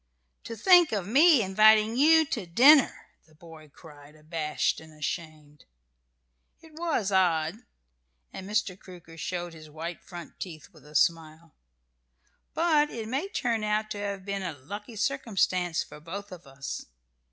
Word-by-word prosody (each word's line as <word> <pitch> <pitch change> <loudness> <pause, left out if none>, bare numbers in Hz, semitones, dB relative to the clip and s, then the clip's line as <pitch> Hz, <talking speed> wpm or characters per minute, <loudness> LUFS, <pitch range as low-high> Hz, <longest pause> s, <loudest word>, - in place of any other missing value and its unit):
"To 230 - -6
think 350 - +5
of 200 -5 -2
me 280 - +5
inviting 215 +3 +4
you 320 +4 +5
to 225 -10 -4
dinner!" 265 - +5 0.2
the 155 - -24
boy 160 -1 -15
cried, 145 -1 -16
abashed 155 0 -2
and 160 0 -15
ashamed. 150 -2 -7 0.9
"It 320 - -18
was 310 - -2
odd." 175 -1 +1 0.7
And 190 +1 -8
Mr. 205 -3 -1
Crooker 175 -3 -14
showed 175 +1 -5
his 155 -1 -13
white 165 +3 -7
front 175 -2 -11
teeth 160 -5 -8
with - - -18
a 150 - -15
smile. 165 -1 0 1.0
"But 310 -3 +2
it 225 -2 -6
may 270 - -2
turn 235 - -2
out 215 0 -1
to 205 - -4
have 200 -2 -5
been 200 -1 -3
a 185 -4 -4
lucky 205 - -9
circumstance 195 -8 0
for - - -13
both 195 +6 -8
of 175 -5 -12
us. 135 +1 -7
190 Hz, 150 wpm, -27 LUFS, 160-225 Hz, 1.0 s, think